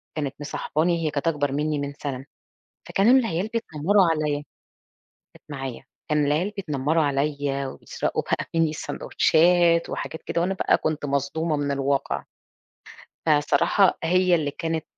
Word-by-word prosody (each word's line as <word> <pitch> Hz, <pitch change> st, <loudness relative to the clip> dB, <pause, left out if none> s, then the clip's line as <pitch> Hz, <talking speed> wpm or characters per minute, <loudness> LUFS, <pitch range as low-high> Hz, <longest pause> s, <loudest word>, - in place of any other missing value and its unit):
كانت 140 Hz, -3 st, -3 dB
مصاحباني، 160 Hz, +3 st, -1 dB
هي 150 Hz, -, 0 dB
كانت 145 Hz, +2 st, -2 dB
أكبر 145 Hz, -4 st, +1 dB
مني 150 Hz, +1 st, -1 dB
من 140 Hz, 0 st, -4 dB
سَنة. 135 Hz, -2 st, -5 dB, 0.6 s
فكانوا 240 Hz, +7 st, +5 dB
العيال 195 Hz, -4 st, -1 dB
بيتنمروا 195 Hz, -2 st, +2 dB
عليَّ 155 Hz, -2 st, 0 dB, 1.0 s
كانت -, -, -19 dB
معايا. 135 Hz, -4 st, -6 dB, 0.3 s
كان 150 Hz, -1 st, +2 dB
العيال 160 Hz, +8 st, +1 dB
بيتنمروا 155 Hz, -2 st, 0 dB
عليَّ 140 Hz, -1 st, -1 dB
وبيسرقوا 130 Hz, -, -3 dB
بقى -, -, -2 dB
مني 165 Hz, -1 st, +3 dB
السندوتشات 170 Hz, +2 st, +2 dB
وحاجات 160 Hz, -, -5 dB
كده، 170 Hz, -, -2 dB
وأنا 190 Hz, +3 st, 0 dB
بقى -, -, +2 dB
كنت 155 Hz, -2 st, -2 dB
مصدومة 145 Hz, +3 st, -1 dB
من 145 Hz, -1 st, -1 dB
الواقع. 140 Hz, 0 st, -1 dB, 1.0 s
فالصراحة 155 Hz, +5 st, +3 dB
هي 180 Hz, +1 st, +3 dB
اللي 150 Hz, -4 st, 0 dB
كانت 160 Hz, +1 st, -3 dB
155 Hz, 135 wpm, -24 LUFS, 145-170 Hz, 1.0 s, فكانوا